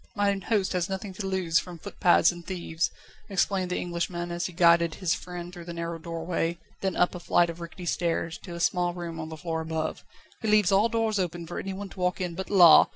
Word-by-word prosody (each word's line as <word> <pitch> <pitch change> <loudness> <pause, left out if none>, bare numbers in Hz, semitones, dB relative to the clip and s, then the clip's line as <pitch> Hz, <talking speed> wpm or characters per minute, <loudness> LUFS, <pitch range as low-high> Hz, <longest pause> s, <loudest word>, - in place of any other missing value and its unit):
"Mine 200 -1 +1
host 200 -2 +1
has 180 -1 0
nothing 190 0 -4
to 195 +1 -4
lose 185 -3 +2
from 180 -2 -8
footpads 175 +1 +3
and 175 0 -10
thieves," 170 -2 -2 0.4
explained 190 -1 +1
the 180 - -1
Englishman 175 0 -3
as 175 0 -1
he - - -9
guided 170 -1 +4
his 180 -4 +1
friend 175 0 -6
through 175 -2 -9
the 170 0 -6
narrow 170 0 -4
doorway, 165 +1 -2 0.2
then 190 -2 -1
up 180 - +3
a 180 - -6
flight 170 0 +3
of 165 - -11
rickety 170 +1 -8
stairs, 170 -1 -1
to 175 -3 -8
a - - -6
small 175 0 +1
room 170 -2 -5
on 160 0 -5
the 160 - -7
floor 165 -1 -3
above. 160 0 -3 0.4
"He 220 - -2
leaves 210 -3 +4
all 205 +4 +4
doors 225 -2 +1
open 175 -2 -2
for 170 - -5
anyone 195 +1 -5
to 195 - -12
walk 180 0 0
in, 180 -2 -2
but, 190 +3 -5
la! 180 -5 +8
175 Hz, 225 wpm, -27 LUFS, 170-190 Hz, 0.4 s, la